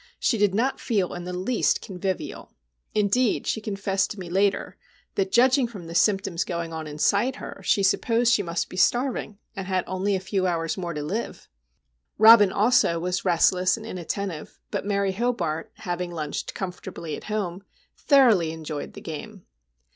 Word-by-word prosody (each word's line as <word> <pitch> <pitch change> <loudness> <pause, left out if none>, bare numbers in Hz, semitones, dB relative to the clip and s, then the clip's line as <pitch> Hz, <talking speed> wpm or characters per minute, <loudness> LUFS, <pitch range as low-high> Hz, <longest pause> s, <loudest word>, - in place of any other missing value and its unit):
She 230 - +1
did 200 -2 +3
not 255 +5 0
feel 200 -7 0
in 175 0 -6
the 180 - -4
least 220 +7 +1
convivial. 190 -1 -5 0.4
Indeed, 215 +3 +2
she 220 - -1
confessed 195 -2 -1
to 205 - -7
me 175 -2 -7
later, 195 +2 +1 0.4
that, 190 -1 -1
judging 255 +1 +4
from 200 -7 -10
the 165 - -8
symptoms 195 -1 +2
going 170 -1 -4
on 160 -1 -5
inside 200 - +1
her, 195 - -9
she 200 +2 +2
supposed 230 +4 +3
she 210 - +3
must 170 -3 -2
be 185 - -10
starving, 240 -1 +1 0.2
and 195 -2 -5
had 185 -2 0
only 190 +2 -1
a - - -1
few 190 0 -1
hours 165 -2 -1
more 175 -4 -4
to 150 - -3
live. 200 +10 -4 0.7
Robin 220 -3 +8
also 225 -5 +3
was 180 +2 -2
restless 180 +1 +3
and 220 - -9
inattentive; 185 -3 -5
but - - -3
Mary 200 -1 +1
Hobart, 190 -8 -2
having 175 0 -4
lunched 155 -4 -5
comfortably 180 -4 -5
at - - -10
home, 200 -4 -3 0.3
thoroughly 230 - +4
enjoyed 155 -2 -6
the - - -10
game. 175 +5 -8
190 Hz, 170 wpm, -25 LUFS, 175-215 Hz, 0.7 s, Robin